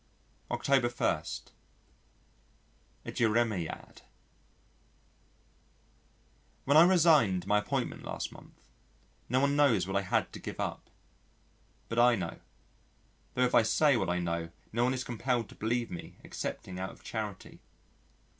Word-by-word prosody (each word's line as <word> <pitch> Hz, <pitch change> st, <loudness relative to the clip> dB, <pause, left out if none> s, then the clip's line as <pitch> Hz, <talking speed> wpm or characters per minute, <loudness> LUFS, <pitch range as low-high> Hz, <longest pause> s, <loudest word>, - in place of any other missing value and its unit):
August 125 Hz, -3 st, +1 dB
1. 80 Hz, -3 st, +1 dB, 1.8 s
A -, -, -4 dB
Jeremiad 110 Hz, -6 st, -1 dB, 2.6 s
When 140 Hz, -, +3 dB
I 160 Hz, -, +10 dB
resigned 155 Hz, -, +4 dB
my 105 Hz, 0 st, +3 dB
appointment 105 Hz, -, -2 dB
last -, -, -5 dB
month, -, -, -17 dB, 0.6 s
no 125 Hz, +2 st, +3 dB
one 140 Hz, +1 st, +2 dB
knows 130 Hz, -11 st, +4 dB
what 95 Hz, +1 st, -4 dB
I 100 Hz, -, +3 dB
had 95 Hz, -, -1 dB
to -, -, -7 dB
give -, -, -7 dB
up. -, -, -4 dB, 1.0 s
But 115 Hz, -, -1 dB
I 120 Hz, 0 st, +6 dB
know. 85 Hz, -5 st, -5 dB, 1.0 s
Tho' 125 Hz, -, +2 dB
if 125 Hz, -, +1 dB
I -, -, +7 dB
say 125 Hz, +7 st, +3 dB
what 110 Hz, -, 0 dB
I 90 Hz, -, +1 dB
know 85 Hz, -1 st, -2 dB, 0.2 s
no 120 Hz, +2 st, +2 dB
one 130 Hz, +1 st, +1 dB
is 130 Hz, -, -3 dB
compelled 120 Hz, -2 st, -1 dB
to -, -, -13 dB
believe 115 Hz, +2 st, -1 dB
me 85 Hz, -, -8 dB
excepting 90 Hz, -1 st, -5 dB
out 95 Hz, 0 st, -3 dB
of -, -, -15 dB
charity. 105 Hz, -4 st, -6 dB
115 Hz, 135 wpm, -31 LUFS, 95-125 Hz, 2.6 s, I